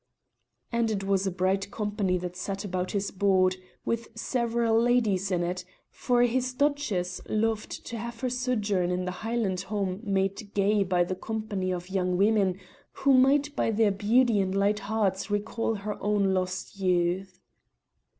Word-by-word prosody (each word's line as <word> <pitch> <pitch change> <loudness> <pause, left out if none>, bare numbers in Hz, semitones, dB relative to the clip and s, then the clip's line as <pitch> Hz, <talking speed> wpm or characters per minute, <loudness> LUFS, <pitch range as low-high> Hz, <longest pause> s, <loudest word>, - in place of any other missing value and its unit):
And 235 -1 +1
it 200 -3 -2
was 195 0 +1
a - - 0
bright 190 +2 0
company 205 -3 -1
that 180 0 -5
sat 195 +2 -4
about 185 -1 -2
his 200 -1 -1
board, 185 -1 +2 0.3
with 230 0 -1
several 235 -1 +1
ladies 220 -6 +2
in 175 -2 0
it, 180 +1 -2 0.3
for 245 -1 +2
his 255 +1 +1
duchess 255 -12 0
loved 220 0 -1
to 230 - -5
have 235 +1 -6
her 255 - 0
sojourn 215 -8 0
in 180 0 -1
her 180 - -2
Highland 215 -2 -2
home 195 -1 -2
made 195 0 -1
gay 205 +1 +3
by 180 -2 +2
the 180 - -3
company 205 -1 -3
of 180 +1 -5
young 180 -2 0
women 200 -2 +2 0.3
who 275 0 +3
might 280 +3 +4
by - - +1
their 220 -1 +3
beauty 220 +3 +3
and 190 0 0
light 200 +1 +2
hearts 200 -2 -1
recall 220 +2 -1
her 210 +1 -5
own 205 -2 +2
lost 185 +1 -3
youth. 180 0 0
200 Hz, 160 wpm, -28 LUFS, 185-225 Hz, 0.3 s, might